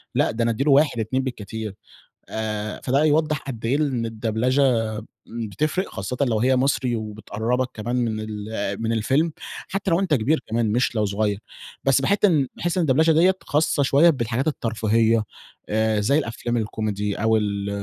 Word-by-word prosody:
لأ - - +2
ده 115 +1 -1
أنا 115 - +2
أدي 115 +4 -1
له 145 - +3
1، 140 -4 +4
2 130 +5 -1
بالكتير. 110 -4 -5 0.5
آآ 110 -1 -4
فده 135 +3 +2
يوضح 155 0 +2
قد 120 -5 -7
إيه 120 +4 +2
ال 150 - +1
إن 120 -4 -2
الدبلچة 115 -1 +1 0.2
بتفرق، 130 - -2
خاصةً 100 +6 -5
لو 120 -6 +2
هي 130 +3 +3
مصري 130 -2 +1
وبتقربك 110 +3 -2
كمان 115 +3 -3
من 115 -3 0
ال 105 -1 -4
من 115 - -1
الفيلم 135 +9 +1 0.4
حتّى 195 -1 -2
لو 170 - +3
أنت 190 -5 0
كبير 145 +5 +2
كمان 115 -1 0
مش 120 +2 +1
لو 105 -1 +1
صغيّر. 100 0 -1 0.4
بس 135 0 +3
باحس 200 +9 +2 0.3
باحس 175 +1 -2
إن 180 - +3
الدبلچة 160 +5 +4
دي 170 +4 +5
خاصة 150 -1 +1
شويّة 140 +5 +5
بالحاجات 125 -1 -1
الترفيهية 115 -4 +1 0.5
آآ 110 0 +1
زي 140 +8 +3
الأفلام 120 -4 -2
الكوميدي 105 -2 -2
أو 110 +1 +2
ال 100 -1 -2
115 Hz, 170 wpm, -23 LUFS, 110-140 Hz, 0.5 s, دي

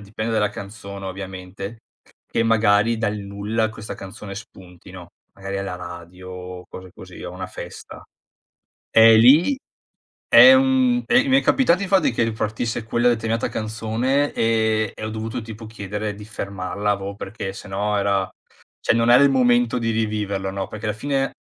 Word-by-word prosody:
dipende 110 +2 -5
dalla 105 -2 +1
canzone 100 -1 -8
ovviamente, 95 +3 -7 0.5
che 115 - +1
magari 115 0 +3
dal 105 -2 -1
nulla 105 +2 -2
questa 110 -1 -8
canzone 100 +1 -9
spuntino, 90 -4 -12 0.2
magari 95 0 -5
alla 100 -2 -4
radio 90 +1 -10
o 90 0 -8
cose 95 -1 -11
così, 90 -1 -12
o 90 - -6
a - - -10
una 95 0 -5
festa. - - -10 0.9
E 115 0 +7
lì 145 - +6 0.7
è 265 - +9
un 260 -2 +3
e 260 +4 +3
mi 265 0 +5
è - - -1
capitato 200 -8 +3
infatti 195 -1 +2
che 115 - -1
ripartisse 115 +1 -2
quella 120 +2 +1
determinata 115 -1 0
canzone 115 +6 -1
e 110 -1 +1
e - - -7
ho 110 - -4
dovuto 110 +1 -4
tipo 110 0 -9
chiedere 105 -1 -5
di 105 +1 -11
fermarla, 100 -1 -4
avevo 100 0 -5
perchè 95 -1 -6
se 105 - -10
no 105 +2 -1
era 100 -1 +1 0.6
cioè - - +3
non 115 0 +3
era 125 +3 +7
il 140 - +5
momento 120 -2 +3
di 115 -1 -1
riviverlo, 105 -3 -2
no. 95 0 -4
Perché 110 0 -7
alla 105 - -1
fine, 135 +3 -1
110 Hz, 165 wpm, -22 LUFS, 100-115 Hz, 0.9 s, è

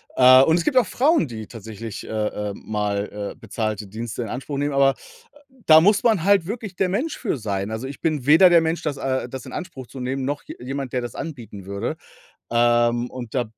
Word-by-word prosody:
Äh, 130 0 +8
und 160 +3 +4
es 170 - 0
gibt 260 - +1
auch 245 - +6
Frauen, 280 - +2
die 110 -3 -8
tatsächlich, 110 -1 -8
äh, - - -10
äh, 105 -1 -2
mal, 105 -1 -3
äh, - - -24
bezahlte 110 -3 -4
Dienste 115 +3 -5
in 115 - -4
Anspruch 135 +3 -5
nehmen, 145 0 0
aber 135 0 +4 0.7
da 155 0 +8
muss 205 +3 +4
man 215 -8 +3
halt 200 -3 +4
wirklich 215 -3 -5
der 185 0 +1
Mensch 255 - -2
für 205 - -2
sein. 100 -2 -3
Also, 115 +4 -4
ich 140 - -9
bin 155 -6 -1
weder 165 +5 +8
der 170 -1 +6
Mensch, 160 +1 -1
das, 145 -3 -2
äh 130 -2 -2
das 130 0 -7
in - - -9
Anspruch 175 -9 -7
zu 135 - -10
nehmen, 130 +1 -3
noch 145 +2 -3
je - - -9
jemand, 135 +1 -5
der 125 - 0
das 120 -2 -7
anbieten 115 - -7
würde. 100 +1 -4 0.5
Ähm, 120 0 +2
und 125 -2 -8
da 125 -2 +1
130 Hz, 220 wpm, -22 LUFS, 110-160 Hz, 0.7 s, Äh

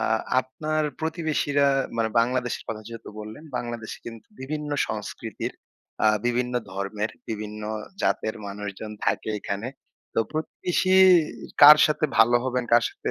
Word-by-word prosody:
আ - - -1 0.4
আপনার 155 +4 -2 0.2
প্রতিবেশীরা 155 -3 +1 0.3
মানে 115 -1 +1
বাংলাদেশের 125 0 -1
কথা 110 -1 -4
যেহেতু 115 -1 -9
বললেন 110 +8 -9
বাংলাদেশে 120 -2 -5
কিন্তু 115 -1 -9
বিভিন্ন 150 +2 -4 0.2
সংস্কৃতি 105 -2 -5 0.6
আ - - +6 0.2
বিভিন্ন 125 +1 0 0.2
ধর্মের 100 +2 -3 0.2
বিভিন্ন 105 -1 -5 0.4
জাতের 110 - 0
মানুষজন 100 +1 -6 0.2
থাকে - - 0
এখানে। 100 +5 -4 0.5
তো - - +3
প্রতিবেশী 180 +4 0 0.7
কার 150 +1 +12
সাথে 155 0 0
ভালো 120 +2 +6
হবেন 125 -1 -1
কার 120 -1 +6
সাথে - - -5
120 Hz, 130 wpm, -25 LUFS, 110-145 Hz, 0.7 s, কার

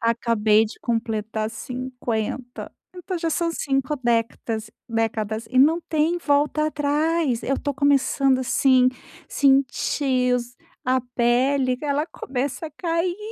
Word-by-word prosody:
acabei 225 -2 +3
de 215 - -11
completar 220 -2 -2
50, 245 0 -4 0.2
então 360 0 -5
já 330 -1 -1
são 335 +1 0
5 275 -2 -1
décatas 230 -2 -1 0.2
décadas 225 -1 -2
e 255 - +1
não 320 +5 +5
tem 320 +3 +1
volta 300 0 +1
atrás. 300 -2 0
Eu 275 - 0
estou 285 - -2
começando, 275 -1 +2
assim, 255 0 +4 0.4
sentir 265 -1 +2
os 245 0 -3 0.3
a 255 +1 +2
pele, 255 +2 +2
que 300 - -9
ela 290 +2 0
começa 275 +3 -4
a - - -9
cair. 335 +3 -1
260 Hz, 125 wpm, -23 LUFS, 235-295 Hz, 0.4 s, não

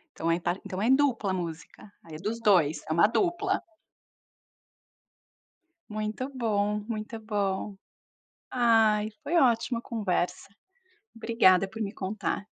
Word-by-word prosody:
Então 165 +1 -1
é 165 - +2
par 175 +1 +1
então 185 +1 -5
é - - +3
dupla 265 -7 +2
a - - 0
música, 165 -1 -8 0.2
aí 160 -2 -11
é 170 - -12
dos 230 +2 -1
2, 160 -5 +4
é - - -9
uma 170 +5 +5
dupla. 375 - 0 2.3
Muito 215 +4 -3
bom, 210 -5 0
muito 220 0 -5
bom. 200 -2 -2 0.7
Ai, 220 -3 +3
foi 345 - -1
ótima 235 -4 +3
a - - -28
conversa. 200 -7 -2 0.7
Obrigada 195 -5 +4
por 220 +3 -8
me 200 -1 -3
contar. 200 +1 -3
215 Hz, 135 wpm, -28 LUFS, 190-230 Hz, 2.3 s, uma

